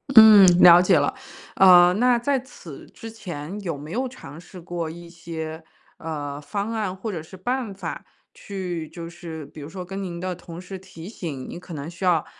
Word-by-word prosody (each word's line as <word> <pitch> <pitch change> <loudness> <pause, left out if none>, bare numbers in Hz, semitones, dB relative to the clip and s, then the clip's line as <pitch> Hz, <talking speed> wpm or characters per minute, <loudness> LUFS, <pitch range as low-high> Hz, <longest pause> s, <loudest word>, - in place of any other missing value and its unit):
嗯， 215 -3 +10 0.2
了 175 0 +9
解 180 -1 +4
了。 145 - 0 0.4
呃， 180 -1 +7
那 245 +3 +3
在 270 +3 +1
此 180 - -12
之 225 - -9
前 185 -4 -7
有 170 -6 -4
没 150 +3 -9
有 255 +6 -1
尝 165 - -11
试 180 +2 -12
过 170 -1 -5
一 170 +1 -10
些， 160 -1 -7 0.3
呃， 145 -3 -5
方 200 +8 -4
案 210 -5 -2
或 200 +3 -5
者 165 -5 -5
是 185 +4 -13
办 245 +1 -3
法 195 - -6 0.3
去 180 -5 -6
就 165 0 -8
是 165 -3 -8
比 150 +2 -12
如 145 - -8
说 180 +1 -7
跟 195 +2 -6
您 175 -2 -6
的 185 0 -3
同 170 -1 -10
事 185 +1 -8
提 185 -3 -12
醒， 160 - -6
您 - - -7
可 180 -1 -11
能 145 0 -6
需 170 +2 -10
要 175 -4 +2
175 Hz, 215 characters per minute, -23 LUFS, 160-195 Hz, 0.4 s, 嗯